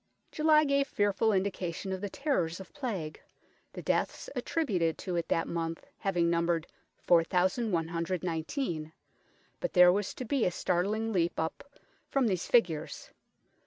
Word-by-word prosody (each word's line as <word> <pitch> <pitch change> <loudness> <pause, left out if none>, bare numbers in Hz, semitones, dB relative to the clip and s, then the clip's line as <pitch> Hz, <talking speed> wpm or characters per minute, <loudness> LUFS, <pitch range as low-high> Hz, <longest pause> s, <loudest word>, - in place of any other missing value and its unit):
July 305 -1 +4
gave 280 -1 +2
fearful 205 +1 +1
indication 190 -2 -2
of 190 0 -3
the 205 - -3
terrors 185 - -1
of 190 - -11
Plague, 210 - -4 0.5
the - - -7
deaths - - -1
attributed 185 - 0
to 180 - -4
it 170 - -1
that 165 - +1
month 165 -1 -3
having 175 -4 +1
numbered 170 -1 +1 0.3
4119, 170 - 0 0.7
but - - -3
there 180 -1 +8
was 205 0 -2
to 255 - -5
be 270 0 +1
a - - +3
startling 205 +6 0
leap 170 -2 +1
up 165 - -4 0.3
from 275 -2 +2
these 185 -6 0
figures. 170 -11 +1
185 Hz, 135 wpm, -30 LUFS, 170-225 Hz, 0.7 s, there